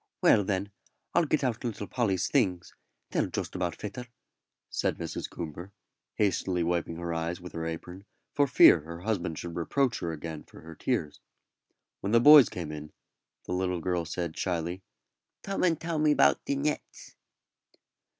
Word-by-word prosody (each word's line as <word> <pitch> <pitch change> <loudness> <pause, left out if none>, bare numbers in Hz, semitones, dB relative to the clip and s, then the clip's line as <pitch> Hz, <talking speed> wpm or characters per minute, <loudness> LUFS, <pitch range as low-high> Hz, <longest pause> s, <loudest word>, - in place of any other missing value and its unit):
"Well, 105 - +6
then, 100 0 -2 0.4
I'll 170 - +4
get 150 -1 0
out 120 -4 -1
little 110 -4 -3
Polly's 100 -6 0
things; 95 -11 0 0.4
they'll - - +1
just - - -4
about 90 -2 -2
fit 105 +3 -7
her," 125 0 -6 0.6
said - - -1
Mrs. - - -5
Coomber, 85 +4 -7 0.4
hastily 95 -3 +1
wiping 85 -1 -1
her 85 0 -4
eyes 85 +1 -2
with 90 0 -10
her 80 0 -3
apron 90 +4 -7 0.3
for 145 -1 +3
fear 125 -8 +7
her 85 +3 -9
husband 90 -6 -2
should 85 -1 -6
reproach 120 - 0
her 85 - -3
again 80 0 -6
for - - -15
her 80 +1 -10
tears. 80 - -2 0.8
When 100 +3 -3
the 115 - +7
boys 145 0 +9
came 85 -4 -5
in, 75 0 -8 0.5
the - - -3
little 90 -1 -1
girl 90 0 -1
said, 85 0 -4
shyly, 85 0 -2 0.6
"Tome 195 0 -3
and 165 -3 +2
tell 165 -1 -2
me 150 0 +4
about - - +4
the 140 - 0
nets." 145 +2 -4
90 Hz, 170 wpm, -29 LUFS, 85-120 Hz, 0.8 s, boys